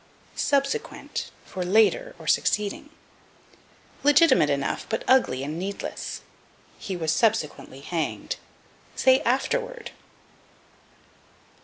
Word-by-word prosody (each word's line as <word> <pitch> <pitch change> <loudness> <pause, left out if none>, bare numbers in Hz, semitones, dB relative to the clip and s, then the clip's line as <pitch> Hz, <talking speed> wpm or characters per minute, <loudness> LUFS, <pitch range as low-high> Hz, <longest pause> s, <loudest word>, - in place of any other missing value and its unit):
Subsequent 280 - -1 0.2
for 185 - -5
Later, 225 - +3
or - - -12
Succeeding. 210 +7 0 1.1
Legitimate 290 - +5
enough, 140 -1 -1
but 220 - -2
ugly 240 - +3
and 150 +4 -4
needless. 200 +2 -5 0.6
"He 190 - -4
was 160 -2 0
subsequently 160 - 0
hanged." 165 +2 -3 0.6
Say, 260 0 +5
afterward. 480 - -1
220 Hz, 90 wpm, -25 LUFS, -, 1.1 s, Legitimate